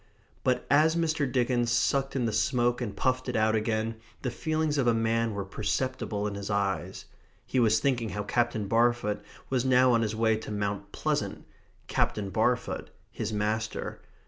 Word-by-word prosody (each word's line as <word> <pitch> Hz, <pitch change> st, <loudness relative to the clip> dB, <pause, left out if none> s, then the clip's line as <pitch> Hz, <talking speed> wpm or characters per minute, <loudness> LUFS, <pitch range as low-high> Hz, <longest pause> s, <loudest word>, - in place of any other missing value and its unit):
But 125 Hz, -1 st, +1 dB
as 155 Hz, +3 st, +4 dB
Mr. 160 Hz, -5 st, 0 dB
Dickens 120 Hz, -1 st, +1 dB
sucked 135 Hz, +3 st, +1 dB
in 125 Hz, -3 st, +1 dB
the 110 Hz, -, -1 dB
smoke 120 Hz, +3 st, +1 dB
and 105 Hz, -4 st, -4 dB
puffed 130 Hz, 0 st, 0 dB
it 125 Hz, -, -2 dB
out 110 Hz, 0 st, +3 dB
again, 110 Hz, 0 st, -1 dB, 0.3 s
the 125 Hz, -, -1 dB
feelings 155 Hz, +2 st, 0 dB
of 130 Hz, -, +2 dB
a 115 Hz, -, +4 dB
man 115 Hz, -1 st, +1 dB
were 100 Hz, -1 st, -3 dB
perceptible 105 Hz, +1 st, -2 dB
in 105 Hz, -, -2 dB
his 100 Hz, 0 st, -5 dB
eyes. 100 Hz, -2 st, -1 dB, 0.4 s
He 130 Hz, -, 0 dB
was 110 Hz, -2 st, +4 dB
thinking 120 Hz, -5 st, 0 dB
how 105 Hz, +2 st, -3 dB
Captain 115 Hz, -2 st, 0 dB
Barfoot 115 Hz, -1 st, +2 dB, 0.3 s
was 130 Hz, -2 st, +2 dB
now 130 Hz, -1 st, +5 dB
on 115 Hz, -1 st, +3 dB
his 110 Hz, -1 st, -1 dB
way 110 Hz, 0 st, +2 dB
to 110 Hz, -, -8 dB
Mount 100 Hz, -1 st, -3 dB
Pleasant; -, -, -2 dB, 0.4 s
Captain 100 Hz, -2 st, -1 dB
Barfoot, -, -, 0 dB, 0.2 s
his 110 Hz, 0 st, -4 dB
master. 110 Hz, +1 st, -2 dB
115 Hz, 170 wpm, -28 LUFS, 105-130 Hz, 0.4 s, now